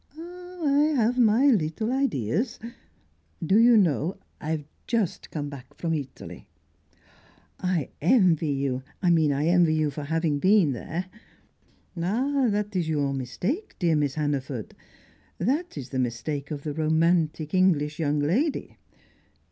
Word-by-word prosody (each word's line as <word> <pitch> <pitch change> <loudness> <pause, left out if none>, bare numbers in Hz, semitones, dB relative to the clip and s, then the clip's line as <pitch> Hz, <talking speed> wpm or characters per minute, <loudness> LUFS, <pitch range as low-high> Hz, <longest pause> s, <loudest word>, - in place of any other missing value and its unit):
"Oh, 355 0 -8
I 295 +2 +3
have 240 +3 +2
my 230 +3 +4
little 205 +3 0
ideas. 225 - -1 0.9
Do 195 +7 +4
you 235 0 +6
know, 175 -2 +1 0.2
I've 155 -1 -3 0.2
just 225 -7 -1
come 145 -2 -4
back 140 -3 -11
from 165 -1 -2
Italy." 145 -4 -7 1.1
"I 180 -6 -1
envy 170 - +3
you 135 -2 -1 0.2
I 175 - +4
mean, 160 -3 +3
I 140 +2 0
envy 170 -2 +4
you 155 -1 +1
for 145 +1 -6
having 160 -1 0
been 190 -3 +4
there." 160 +9 -4 0.9
"Ah, 250 +10 0
that 205 0 -2
is 170 -3 0
your 145 -3 0
mistake, 180 - -3
dear 170 -4 +2
Miss 145 -3 0
Hannaford! 140 -6 -3 0.6
That 300 - -1
is 135 -3 -6
the 130 - -3
mistake 135 +4 -3
of 145 -2 -5
the 150 - -3
romantic 160 0 +1
English 160 -5 +2
young 150 -2 +1
lady. 210 - 0
165 Hz, 140 wpm, -26 LUFS, 145-215 Hz, 1.1 s, you